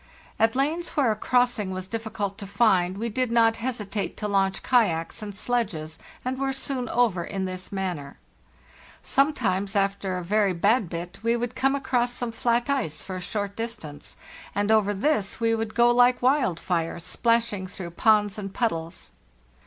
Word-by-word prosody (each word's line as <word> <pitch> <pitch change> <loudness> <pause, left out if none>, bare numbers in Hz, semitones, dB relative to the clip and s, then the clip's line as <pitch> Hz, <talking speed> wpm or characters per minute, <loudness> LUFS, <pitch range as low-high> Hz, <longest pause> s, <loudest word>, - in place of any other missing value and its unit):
At 225 +1 +3
lanes 310 +6 0
where 265 -6 +4
a - - 0
crossing 245 -2 +1
was 185 0 -4
difficult 215 -2 -4
to 200 - -7
find 195 -3 +2
we 230 +3 -2
did 245 +2 -1
not 225 -1 +4
hesitate 220 -4 -3
to 210 - -2
launch 195 -1 +1
kayaks 205 -11 +1
and 205 -2 -6
sledges, 190 -10 -2 0.3
and 260 +1 -2
were 270 0 0
soon 265 -2 -3
over 225 -8 +2
in 190 +2 -3
this 185 0 -6
manner. 180 -8 -4 0.9
Sometimes 220 -9 +1
after 195 -1 0
a 180 - -4
very 200 +1 +2
bad 200 +3 +2
bit 170 +2 -6
we 230 +1 +2
would 240 +1 -3
come 270 +1 +1
across 245 -3 0
some 245 -1 -3
flat 235 +2 +1
ice 260 - -1
for 190 - -6
a - - -6
short 200 +2 -3
distance, 210 -11 -6 0.4
and 205 +1 +1
over 215 -2 +4
this 205 0 0
we 230 -1 +2
would 225 -1 -2
go 240 0 +5
like 245 +1 +5
wild 255 - +2
fire, 170 -2 -1
splashing 230 +1 0
through 185 -2 -7
ponds 210 +2 +3
and 195 -1 -6
puddles. 165 -9 -2
215 Hz, 170 wpm, -26 LUFS, 190-240 Hz, 0.9 s, go